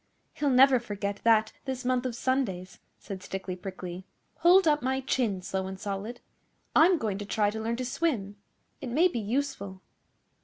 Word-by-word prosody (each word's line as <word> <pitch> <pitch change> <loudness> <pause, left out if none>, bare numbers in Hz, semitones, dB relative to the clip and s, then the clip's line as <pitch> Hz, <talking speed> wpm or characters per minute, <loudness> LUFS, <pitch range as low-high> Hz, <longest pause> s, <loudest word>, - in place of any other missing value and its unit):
'He'll 290 - 0
never 260 0 +6
forget 205 -3 -4
that 220 -1 +4
this 260 -2 -4
month 255 0 +1
of 240 - -5
Sundays,' 230 -9 -2 0.2
said 195 -2 -8
Stickly 190 -1 -5
Prickly. 185 -1 -7 0.3
'Hold 360 +1 +6
up 300 -1 +3
my 265 +1 0
chin, 225 -8 -1
Slow 190 0 -3
and 190 0 -7
Solid. 205 +5 -5 0.5
I'm 345 +3 +6
going 210 -8 -2
to 205 - -5
try 205 -1 +1
to 220 +1 -5
learn 230 +1 -1
to 255 +1 -3
swim. 240 -8 -1 0.4
It 265 - -5
may 310 +9 +4
be 250 -10 -3
useful. 210 -5 -3
225 Hz, 175 wpm, -28 LUFS, 195-265 Hz, 0.5 s, never